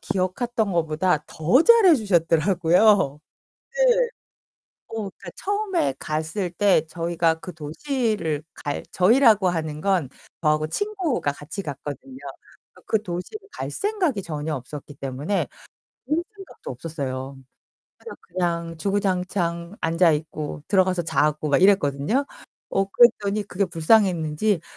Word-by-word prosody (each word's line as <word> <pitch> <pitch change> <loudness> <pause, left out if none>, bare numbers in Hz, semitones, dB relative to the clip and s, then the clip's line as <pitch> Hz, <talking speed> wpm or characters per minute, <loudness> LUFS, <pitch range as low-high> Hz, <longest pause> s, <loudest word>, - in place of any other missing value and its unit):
기억했던 210 +4 -1
것보다 160 -1 +1
더 175 - +3
잘해 410 -7 +7
주셨더라고요. 175 - +3 0.6
네. - - +3 0.8
어 - - -9 0.2
그러니까 - - -11
처음에 395 - -1
갔을 160 +5 -2
때 180 -3 +3
저희가 165 -1 0
그 180 0 -8
도시를 170 - -2
갈 145 - -4
저희라고 215 0 +5
하는 155 -3 -3
건 185 -6 +1 0.3
저하고 155 -1 +2
친구가 365 - -1
같이 150 +7 -7
갔거든요. 145 - -7 0.6
그러니까 - - -20
그 220 - +1
도시를 210 - -6
갈 - - -5
생각이 370 - -1
전혀 155 -3 -4
없었기 145 +3 -9
때문에. 140 +8 -2 0.6
볼 320 +3 +1
생각도 390 -2 -11
없었어요. 135 -1 -5 0.6
그래서 460 - -10
그냥 170 -2 -3
주구장창 180 -2 -1
앉아 165 0 +3
있고 150 -1 -5
들어가서 185 -2 +3
자고 150 -1 0
막 145 - +3
이랬거든요. 190 - +3 0.5
어 195 - +2
그랬더니 205 -1 +3
그게 200 0 -1
불쌍했는지 175 0 +2
180 Hz, 290 characters per minute, -23 LUFS, 155-215 Hz, 0.8 s, 잘해